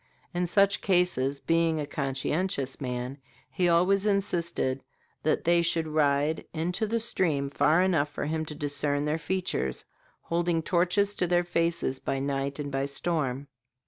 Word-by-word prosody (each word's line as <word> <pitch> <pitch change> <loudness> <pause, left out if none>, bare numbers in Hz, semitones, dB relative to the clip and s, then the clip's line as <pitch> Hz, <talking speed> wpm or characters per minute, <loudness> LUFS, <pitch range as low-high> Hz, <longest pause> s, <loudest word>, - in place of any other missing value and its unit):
In 175 0 0
such 200 +3 +3
cases, 175 -8 +2
being 165 0 +1
a 150 - -2
conscientious 140 +1 -2
man, 125 +1 -4 0.3
he 175 +6 +1
always 190 +4 +3
insisted 170 -9 0 0.4
that 155 - +1
they 170 0 +4
should 165 -1 +1
ride 150 0 +1
into 180 +7 -1
the 230 +2 0
stream 160 -11 0
far 155 +5 +3
enough 160 -6 +2
for 145 - -4
him 160 +1 -1
to 150 - -7
discern 145 0 -1
their 150 +2 0
features, 180 - -2 0.4
holding 170 -1 0
torches 185 +3 +2
to 180 - 0
their 175 0 +2
faces 170 -6 -1
by 135 - -2
night 140 0 -2
and 145 -1 -4
by 135 0 -1
storm. 140 -2 -2
160 Hz, 150 wpm, -28 LUFS, 140-175 Hz, 0.4 s, they